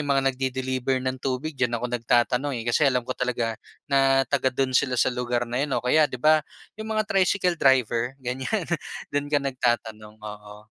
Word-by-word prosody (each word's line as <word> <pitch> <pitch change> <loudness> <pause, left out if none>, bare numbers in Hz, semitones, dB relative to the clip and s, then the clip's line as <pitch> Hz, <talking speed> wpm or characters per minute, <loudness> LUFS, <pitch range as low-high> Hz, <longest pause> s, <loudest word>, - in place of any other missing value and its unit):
yung 145 - -4
mga 135 0 +2
nag-de-deliver 130 0 -1
ng 130 0 -2
tubig 135 +4 -2
diyan 125 -3 0
ako 120 +1 -4
nagtatanong, 125 +3 +1
eh, 115 - -5
kasi 135 +4 +3
alam 125 -2 0
ko 130 - -3
talaga 125 -3 -1 0.3
na 135 -1 +3
taga 135 +1 +1
do'n 130 +1 -1
sila 130 -1 +2
sa 125 - +2
lugar 120 -1 -1
na 120 +2 -3
'yon, 145 -1 -1
o 120 - -3
kaya 150 +4 +4
'di 125 - -6
ba 155 +4 +4 0.4
yung 220 - -6
mga 215 - +2
tricycle 185 -3 +1
driver, 125 -1 +2
ganyan. 130 - -3 0.5
Do'n 145 0 -1
ka 150 - +2
nagtatanong, 115 -5 -2
oo. 105 0 -10
130 Hz, 190 wpm, -25 LUFS, 120-140 Hz, 0.5 s, kaya